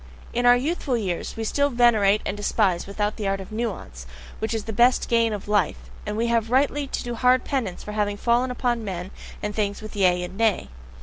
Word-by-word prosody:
In 245 +1 +2
our 245 - +8
youthful 275 -1 -1
years 185 -6 -3
we 225 - -2
still 285 +6 +1
venerate 220 -5 +3
and 195 - -2
despise 200 -4 0
without 205 +1 -2
the 210 - -2
art 195 0 0
of 190 +2 -9
NUANCE, 190 - -5 0.3
which 220 - -2
is 225 -2 -2
the 220 - -5
best 245 +4 +3
gain 230 -1 +2
of 205 -2 -5
life, 205 -2 +1 0.3
and 210 0 -3
we 230 - +1
have 230 -1 +1
rightly 280 +3 +1
to - - -4
do 240 -1 -4
hard 250 +2 +3
penance 235 -10 -3
for 210 - -6
having 205 -1 -1
fallen 240 +3 +2
upon 245 -2 -1
men 185 -2 -5 0.3
and 210 0 -2
things 205 -1 -1
with 215 -1 -9
Yea 180 -3 +3
and 180 +1 -7
Nay. 220 - +1
220 Hz, 220 wpm, -24 LUFS, 200-240 Hz, 0.3 s, our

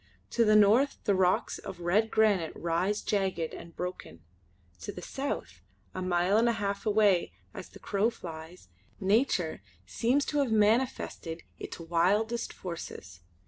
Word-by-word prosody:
To 235 - +3
the 215 -1 +4
north 215 +7 +5
the 205 - +2
rocks 185 -1 +1
of - - -8
red 200 +6 +2
granite 205 -8 +2
rise 175 +5 -1
jagged 190 -5 -1
and 170 0 -10
broken. 180 - -6 0.6
To - - -6
the - - -9
south, 85 0 -4 0.3
a 185 - -4
mile 180 +2 +2
and 235 +1 +4
a - - +2
half 200 0 -3
away 205 -4 +3 0.2
as - - -8
the - - -13
crow 205 +2 0
flies, 165 - -10 0.3
Nature 195 -4 +1 0.2
seems 260 +5 +1
to 295 - -1
have 270 -5 +1
manifested 215 -6 +1 0.2
its - - -7
wildest 190 +8 +1
forces. 165 - -8
195 Hz, 145 wpm, -29 LUFS, 170-220 Hz, 0.6 s, north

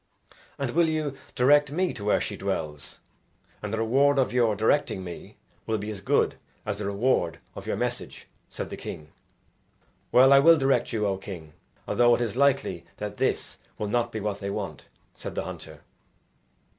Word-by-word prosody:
"And 135 -3 -2
will 165 +2 +3
you 155 -3 -1 0.2
direct 145 +3 +5
me 180 +3 0
to 100 - -8
where 105 - +3
she - - -3
dwells? 75 -2 -4 0.6
and 105 - -4
the 110 - -1
reward 135 +6 +3
of 130 -2 +2
your 115 -4 +3
directing 110 -2 +1
me 90 -2 -9 0.3
will 110 - +1
be 105 +1 -4
as 100 -2 -7
good - - +2 0.3
as 105 -1 -3
the 105 - -2
reward 100 -5 +1 0.2
of - - -9
your - - 0
message," - - -4 0.2
said - - -6
the - - -5
king. 75 -1 -8 1.0
"Well, 130 +2 +7
I 135 - +8
will 165 +4 +7
direct 135 -4 +2
you, 110 -3 0
O 100 -1 0
king, 85 -6 -9 0.3
although 120 -1 +4
it - - -3
is 115 -3 -1
likely 135 -10 +2
that 105 0 -5
this - - -1 0.2
will 105 - -3
not 120 +1 0
be 110 - -4
what 105 -1 -3
they 100 - -4
want," 100 - -5 0.3
said - - -7
the - - -1
hunter. - - -8
115 Hz, 180 wpm, -27 LUFS, 100-135 Hz, 1.0 s, I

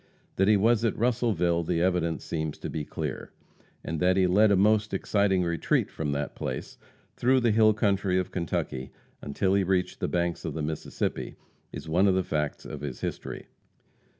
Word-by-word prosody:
That 95 - +3
he 105 -1 +5
was 115 +2 +3
at 115 - 0
Russellville 110 -8 +1
the 85 0 0
evidence 85 -3 0
seems 80 -2 -3
to - - -6
be 75 - -3
clear; - - -5 0.5
and 80 -1 -3
that 90 +2 +3
he 95 - +4
led 100 +4 +4
a 100 - +4
most 105 +1 +3
exciting 95 -1 +1
retreat 85 -1 0
from 75 -2 -3
that 70 0 -3
place, 65 - -5 0.4
through 130 +2 +3
the 120 -2 +3
hill 110 0 +5
country 100 -3 +1
of 95 - -1
Kentucky, 65 -7 -3 0.3
until 95 +7 0
he 100 0 +3
reached 95 -1 0
the - - -1
banks 85 -1 -1
of - - -4
the 80 - -2
Mississippi, 80 +1 -3 0.4
is - - -8
one 90 +5 +3
of 95 - +3
the 95 - +1
facts 75 -3 -2
of - - -7
his 70 -4 -6
history. - - -5
95 Hz, 185 wpm, -27 LUFS, 80-105 Hz, 0.5 s, he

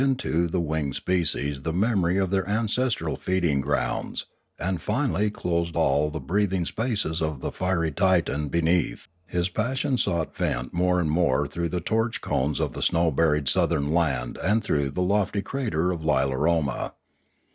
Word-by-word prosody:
into 130 -11 +1
the 90 +2 -1
winged 80 -4 -1
species 75 -6 0
the 80 - -2
memory 95 -1 +1
of 95 -2 0
their 95 -1 0
ancestral 115 +4 0
feeding 85 -7 0
grounds, - - -2 0.3
and 90 -2 -2
finally 105 -3 0
closed 85 -4 -2
all 75 +1 +2
the 80 - -5
breathing 95 +4 0
spaces 105 -7 -1
of 80 -4 -2
the - - -3
fiery 90 -3 0
Titan 85 -3 +1
be 85 +3 0
neath, 85 +1 +1 0.2
his 90 0 0
passion 130 +6 -1
sought 85 -2 -1
vent - - -2
more 90 +1 +2
and 80 -3 0
more 80 -5 +2
through 85 0 -3
the 90 - -1
torch 110 +5 0
cones 70 +3 -1
of - - -1
the - - -6
snow 85 0 +2
buried 75 -1 +2
southern 75 0 +1
land 70 -8 0
and 105 +5 +2
through 70 -9 0
the 90 +7 -1
lofty 100 +1 +1
crater 95 - -1
of 85 -3 -4
Lilaroma. 70 0 +1
85 Hz, 165 wpm, -25 LUFS, 75-100 Hz, 0.3 s, all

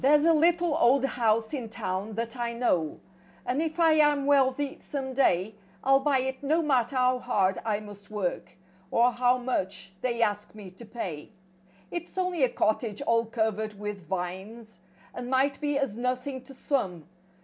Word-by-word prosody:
V - - +4
A 300 +3 +5
LITTLE 335 0 +3
old 260 +3 +4
house 225 -3 +1
in 250 -6 -4
town 200 0 -4
that 230 +1 -3
I 240 -1 -2
know, 180 -10 +1
f* - - -20 0.4
And 255 +5 0
if 320 +1 -3
I 325 -1 +6
am 295 -2 +3
wealthy 275 0 +2
some 265 -2 -4
day, 215 -6 +2 0.3
I'll 270 0 +5
buy 275 -2 +2
it 265 +1 -4
no 310 +4 +1
matter 265 -3 +1
how 255 0 +3
hard 195 -7 +1
I 215 -2 -1
must 205 -1 -12
work, 205 -4 -3 0.3
Or 240 +4 +4
how 245 +1 +2
much 195 -6 -3
they 235 -2 +1
ask 210 -1 -2
me 200 -4 -10
to 210 +6 -13
pay. 180 -8 -6 0.6
It's 345 +1 -6
only 365 -3 0
a 255 - +4
cottage 215 +1 0
all 230 -3 +2
covered 220 -2 -2
with 205 -5 -6
vines. 190 +4 -5 0.3
And 245 0 -6
might 270 +3 +1
be 290 -1 0
as 275 -7 -1
nothing 250 +2 -2
to 270 - -11
some. 190 - -2
245 Hz, 175 wpm, -28 LUFS, 210-275 Hz, 0.6 s, I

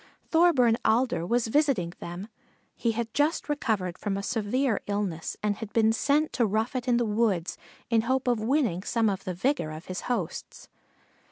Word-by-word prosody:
Thorburn 300 -9 +4
Alder 230 -7 +2
was 235 +3 +1
visiting 225 - +1
them. 175 +4 -6 0.5
He 230 -1 0
had 230 0 -3
just 295 +3 +1
recovered 215 - -1
from 200 -2 -2
a 200 - -4
severe 225 +3 0
illness 200 -6 -2
and 205 -1 0
had 225 -2 -7
been 220 -1 +4
sent 290 +6 +1
to 240 - +2
rough 220 +5 -1
it 255 0 -3
in 245 -1 +3
the 240 - +1
woods 210 -5 0 0.4
in 225 -1 +4
hope 260 +3 0
of 240 -2 +2
winning 225 - +1
some 225 +1 +1
of 195 0 -5
the 185 - -3
vigor 255 - 0
of 155 +2 -8
his 185 - -5
hosts. 215 -10 -4
225 Hz, 180 wpm, -27 LUFS, 195-255 Hz, 0.5 s, Thorburn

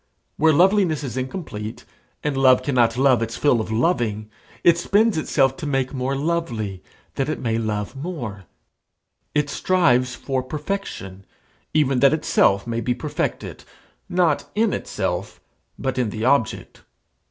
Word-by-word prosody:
Where 160 +1 +4
loveliness 175 -1 +3
is 130 -3 -5
incomplete, 130 - -5 0.4
and 150 -2 -1
love 130 -1 +5
cannot 120 -4 +2
love 130 -3 +4
its 115 0 -3
fill 125 -6 +3
of 110 - -5
loving, 110 - 0 0.3
it 170 0 +5
spends 210 +5 +2
itself 135 -4 +1
to 155 - -5
make 135 -2 -1
more 130 +1 -1
lovely, 130 - -2 0.4
that 135 +2 0
it 155 - -1
may 115 -2 -1
love 105 +1 -3
more; 130 - -6 0.9
it 150 -1 +2
strives 140 -7 +2
for 130 +1 -2
perfection, 130 - -5 0.5
even 135 -4 +3
that 140 +3 +5
itself 100 -10 +2
may 115 0 -2
be 125 +2 0
perfected 120 - -4 0.5
not 175 -4 +1
in 220 -1 +2
itself, - - -3 0.4
but 130 -1 -2
in 120 -4 +1
the 110 +2 -3
object. 130 -4 0
135 Hz, 140 wpm, -22 LUFS, 115-155 Hz, 0.9 s, love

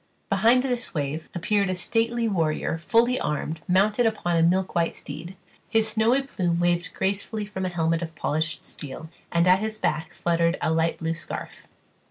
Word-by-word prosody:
Behind 245 +3 +4
this 245 -7 -2
wave 150 +2 -3
appeared 200 +3 +1
a 185 - 0
stately 230 +5 0
warrior 165 -4 0
fully 235 +8 +3
armed, 155 +2 -2
mounted 205 +6 +3
upon 175 -6 0
a 165 - +3
milk 185 +3 +2
white 170 -1 +1
steed; 160 +6 -8 0.3
his 225 -1 +2
snowy 230 +5 +2
plume 175 -10 -1
waved 175 0 0
gracefully 205 +2 -1
from 190 -2 -3
a - - -1
helmet 165 -1 0
of 165 -1 -6
polished 160 +2 -2
steel, 155 +2 -8 0.2
and 170 +1 +3
at 185 +1 +6
his 215 +1 -2
back 160 -6 -1
fluttered 170 0 +1
a - - 0
light 165 +1 +1
blue 165 0 -1
scarf. 165 - -7
175 Hz, 175 wpm, -25 LUFS, 165-215 Hz, 0.3 s, at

